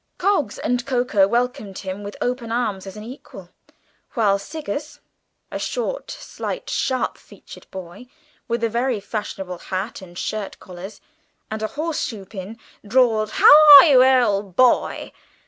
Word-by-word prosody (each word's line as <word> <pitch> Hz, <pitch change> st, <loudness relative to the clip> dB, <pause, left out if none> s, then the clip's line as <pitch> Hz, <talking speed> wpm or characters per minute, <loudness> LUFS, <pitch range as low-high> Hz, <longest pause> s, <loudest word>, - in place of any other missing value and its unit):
Coggs 350 Hz, -, 0 dB
and 245 Hz, 0 st, -1 dB
Coker 245 Hz, -7 st, +2 dB
welcomed 235 Hz, -3 st, -2 dB
him 190 Hz, +1 st, -6 dB
with 205 Hz, 0 st, -8 dB
open 245 Hz, -2 st, -3 dB
arms 215 Hz, -5 st, -2 dB
as 195 Hz, -, -9 dB
an 210 Hz, -, -8 dB
equal, 250 Hz, +5 st, -12 dB, 0.6 s
while 205 Hz, -4 st, +2 dB
Siggers, 300 Hz, +3 st, -6 dB, 0.5 s
a -, -, -4 dB
short, -, -, -4 dB
slight, -, -, -6 dB
sharp 260 Hz, -1 st, -1 dB
featured -, -, -15 dB
boy, 190 Hz, +5 st, -10 dB, 0.4 s
with 235 Hz, 0 st, -2 dB
a -, -, +3 dB
very 240 Hz, 0 st, -1 dB
fashionable 195 Hz, -3 st, -6 dB
hat 195 Hz, +3 st, -5 dB
and 175 Hz, -2 st, -13 dB
shirt 210 Hz, -1 st, -4 dB
collars, 190 Hz, +3 st, -11 dB, 0.5 s
and 220 Hz, 0 st, -4 dB
a 215 Hz, -, -1 dB
horse 315 Hz, 0 st, -2 dB
shoe 220 Hz, -8 st, -6 dB
pin, 195 Hz, +2 st, -9 dB, 0.3 s
drawled, 220 Hz, -1 st, +2 dB
"How -, -, +7 dB, 0.3 s
are -, -, +7 dB
you, 265 Hz, -5 st, +6 dB
old 210 Hz, -8 st, +2 dB
boy?" 255 Hz, +1 st, +2 dB
220 Hz, 145 wpm, -21 LUFS, 195-250 Hz, 0.6 s, How